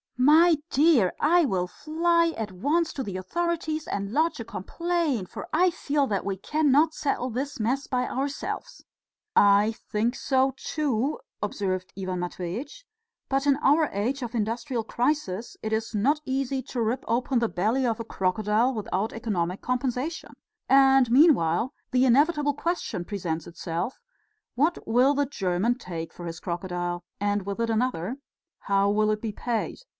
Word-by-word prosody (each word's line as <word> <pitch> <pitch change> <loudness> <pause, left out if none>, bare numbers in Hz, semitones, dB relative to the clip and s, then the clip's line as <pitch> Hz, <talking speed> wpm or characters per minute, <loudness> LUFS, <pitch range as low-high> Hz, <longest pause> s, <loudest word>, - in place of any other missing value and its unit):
"My 315 +6 +6
dear! 280 - +4
I 340 +3 +4
will 185 -7 0
fly 335 - +1
at 215 -3 -4
once 305 - 0
to 270 - -3
the 195 -5 -5
authorities 315 - -2
and 200 0 -3
lodge 315 +1 +1
a 230 - -5
complaint, 280 - -2
for - - -7
I 365 0 +4
feel 290 -3 0
that 200 -5 -2
we 195 -1 -2
cannot 300 - +2
settle 265 -4 -1
this 265 +3 -4
mess 255 +6 0
by 250 -1 0
ourselves." 285 - -4 0.5
"I 205 +2 +5 0.2
think 225 +4 +1
so 265 0 +1
too," 285 - -1 0.2
observed 185 -2 -2
Ivan 185 -1 -3
Matveitch; 185 - -5 0.4
"but 270 +1 +1
in 280 -1 +4
our 295 +2 +3
age 240 +8 -1
of 240 -1 -5
industrial 230 +2 -2
crisis 235 -4 -2
it 220 0 -3
is 220 +1 -2
not 265 +9 +2
easy 265 0 -1
to 250 -1 -4
rip 235 +4 -1
open 245 +2 +1
the 230 -1 0
belly 225 +8 0
of 230 -2 0
a - - -3
crocodile 215 +5 +1
without 215 -1 -2
economic 190 -6 -2
compensation, 255 +5 -2 0.4
and 270 -2 +5
meanwhile 250 - +4 0.2
the 255 0 +3
inevitable 290 +3 +3
question 310 - -3
presents 170 -6 -3
itself: 170 +7 -4 0.6
What 310 +7 0
will 250 +5 +4
the 285 0 +1
German 195 -2 0
take 165 -8 -6
for 175 - -9
his 165 -1 -6
crocodile? 175 0 -3 0.2
And 205 -1 0
with 200 +2 -4
it 230 0 0
another: 230 -1 -1 0.4
How 200 0 +2
will 215 +1 +2
it 210 0 -2
be 225 - -3
paid? 230 +2 -3
240 Hz, 155 wpm, -26 LUFS, 200-285 Hz, 0.6 s, My